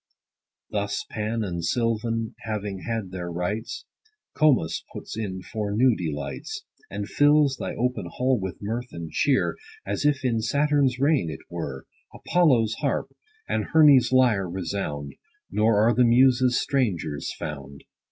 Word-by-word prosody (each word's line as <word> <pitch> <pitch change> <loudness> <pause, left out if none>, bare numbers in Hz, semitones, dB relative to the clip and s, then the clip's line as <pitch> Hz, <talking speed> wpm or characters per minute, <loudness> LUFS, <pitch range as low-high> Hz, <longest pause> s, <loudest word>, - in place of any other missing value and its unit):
Thus 100 +6 -2
Pan 110 +1 -2
and 85 -4 -4
Sylvan 115 +3 -1
having 105 -3 -4
had 110 -5 -3
their 90 -2 -5
rites, 95 +6 -3 0.5
Comus 145 - +2
puts - - -7
in 95 -4 -4
for 105 -2 -3
new 125 +1 +4
delights; 80 - -5 0.3
And - - -4
fills 145 -2 +4
thy - - -4
open 125 +1 -1
hall 130 -1 0
with 95 -3 -5
mirth 115 +4 -3
and 85 -1 -7
cheer, 140 -2 +1 0.3
40 - - -2
As - - -2
if 145 -2 +2
in 115 -3 +1
Saturn's 140 0 +2
reign 140 - +2
it 75 - -7
were; - - -5 0.3
Apollo's 130 -11 +2
harp, - - -2 0.3
and - - 0
Hermes' 145 -6 +6
lyre 120 -8 +3
resound, 85 -5 -4 0.4
Nor 105 0 +3
are 120 - +4
the 125 - +4
Muses 125 +1 +4
strangers 90 - -1
found. 70 -2 -7
115 Hz, 140 wpm, -25 LUFS, 95-130 Hz, 0.5 s, Hermes